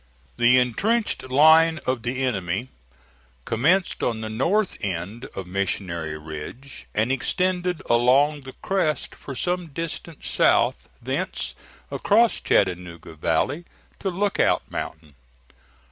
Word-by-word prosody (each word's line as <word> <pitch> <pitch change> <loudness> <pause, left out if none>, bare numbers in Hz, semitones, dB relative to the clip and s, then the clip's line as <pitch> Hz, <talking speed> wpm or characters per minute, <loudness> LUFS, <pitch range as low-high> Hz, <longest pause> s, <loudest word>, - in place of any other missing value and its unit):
The 120 +1 +5
intrenched 195 - +1
line 160 +4 +6
of 130 -2 0
the 125 +3 -2
enemy 100 -1 -1 0.8
commenced 165 - +1
on 115 -2 -1
the 110 0 -4
north 175 - +1
end 100 +5 -4
of 95 - -5
Missionary 90 -4 -3
Ridge 80 - -9
and 110 +4 +2
extended 180 +6 0
along 135 +5 +4
the 130 -1 -10
crest 185 -6 0
for 135 - -9
some 180 +4 -1
distance 165 +1 -6
south, - - +2
thence 150 +10 -2 0.4
across 235 -1 +3
Chattanooga 90 -4 0
valley 85 - 0 0.4
to 195 - -1
Lookout 195 +2 +1
Mountain. 80 -2 -6
130 Hz, 115 wpm, -24 LUFS, 100-165 Hz, 0.8 s, line